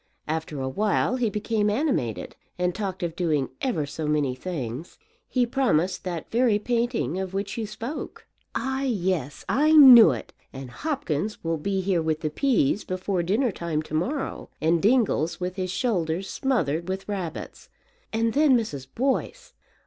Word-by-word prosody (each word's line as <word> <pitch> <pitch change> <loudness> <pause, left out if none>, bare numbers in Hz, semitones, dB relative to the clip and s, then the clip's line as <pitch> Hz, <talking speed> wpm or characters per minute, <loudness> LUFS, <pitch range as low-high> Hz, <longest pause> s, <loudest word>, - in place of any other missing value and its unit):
After 155 -2 -3
a 130 - -2
while 210 - +1
he 240 -3 +1
became 210 0 0
animated, 210 - -1 0.2
and 180 0 0
talked 190 -3 -4
of 170 -1 -2
doing 155 -7 0
ever 220 - 0
so 150 +2 -5
many 150 -4 +1
things. 135 -1 -6 0.3
He 250 -2 +1
promised 190 - 0
that 175 -3 -5
very 235 -2 +3
painting 235 -3 -1
of 190 0 -4
which 195 0 -3
you 225 -2 -3
spoke." 225 +8 -6 0.3
"Ah, 265 0 -1
yes, 185 - -1
I 295 +9 +3
knew 255 - +10
it; 120 -6 -4 0.2
and 135 -2 -8
Hopkins 215 - -3
will 165 -1 -1
be 195 +4 -1
here 185 -2 +1
with 160 -1 -1
the 155 - -2
peas 215 - +1
before 185 0 -2
dinner 215 +8 +1
time 165 -4 -3
to 155 - -12
morrow, 255 - -2
and 165 +1 +2
Dingles 205 - +2
with 180 0 -3
his 185 -2 -3
shoulders 185 -5 -1
smothered 170 - -1
with 190 +1 -4
rabbits. 190 -5 -5 0.4
And 225 0 0
then 285 -3 +5
Mrs. 145 - -4
Boyce! 275 - -1
190 Hz, 160 wpm, -25 LUFS, 160-235 Hz, 0.4 s, knew